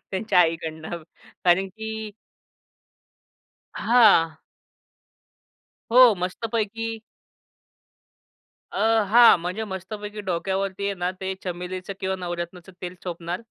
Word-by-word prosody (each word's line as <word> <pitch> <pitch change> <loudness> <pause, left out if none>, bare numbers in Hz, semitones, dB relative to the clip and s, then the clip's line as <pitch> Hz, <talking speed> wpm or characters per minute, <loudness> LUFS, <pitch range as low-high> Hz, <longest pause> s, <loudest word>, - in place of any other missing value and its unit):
त्यांच्या 190 -1 +1
आईकडनं 160 0 -2 0.4
कारण 180 +2 +4
की 220 +2 -6 1.6
हां. 195 -10 +4 1.5
हो, 250 -3 +8
मस्तपैकी 225 +4 -3 1.7
अ, - - -4 0.3
हां, 235 +1 +8
म्हणजे 180 +6 -4
मस्तपैकी 210 +2 -6
डोक्यावरती 190 +2 -2
आहे 200 - -1
ना, 180 0 -2
ते 190 0 -3
चमेलीचं 180 +2 -5
किंवा 190 0 -1
नवरत्नाचं 175 0 -6
तेल 180 0 -5
चोपणार 175 +1 -5
190 Hz, 90 wpm, -24 LUFS, 175-215 Hz, 1.7 s, हो